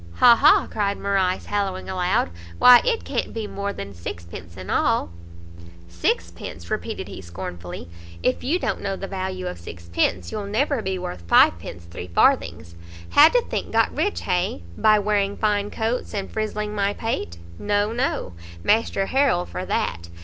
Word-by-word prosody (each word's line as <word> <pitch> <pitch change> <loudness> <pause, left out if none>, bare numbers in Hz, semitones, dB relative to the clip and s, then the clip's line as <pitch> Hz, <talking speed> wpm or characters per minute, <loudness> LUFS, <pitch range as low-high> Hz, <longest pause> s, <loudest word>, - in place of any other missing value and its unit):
"Ha! 240 -1 +7
ha!" - - +5
cried 200 -2 -1
Morrice, 190 -2 0
hallowing 195 -2 -2
aloud, 180 - 0 0.3
"why 250 -1 +9
it 470 -2 0
can't - - -3
be 225 -1 -3
more 200 0 -4
than 100 - -7
sixpence 85 -1 -8
in - - -6
all!" - - +1 0.8
"Sixpence?" 85 0 -3
repeated - - -3
he - - -8
scornfully, 85 -1 -7 0.4
"if 125 - 0
you 300 +7 +1
don't - - -2
know 195 -1 -2
the 195 - -6
value 185 -1 -4
of 180 - -5
sixpence, 85 +1 -2
you'll 205 -1 -4
never 255 +5 0
be 190 -2 -2
worth 135 - -6
fivepence 85 +1 +3
three 85 +1 -8
farthings. 85 -1 +1 0.4
How 300 +2 +8
do - - +3
think - - -3
got - - +2
rich, 410 - 0
hay? 180 - -1
by 215 -1 +4
wearing 205 -1 0
fine 205 -1 +1
coats, 225 +1 -2
and 195 -1 -4
frizzling 210 -1 -3
my 200 -1 0
pate? 155 - -3 0.2
No, 205 +1 0
no; 240 - -1 0.3
Master 210 -2 +2
Harrel 260 -8 +2
for 185 - -6
that! 85 -1 -2
195 Hz, 160 wpm, -23 LUFS, -, 0.8 s, why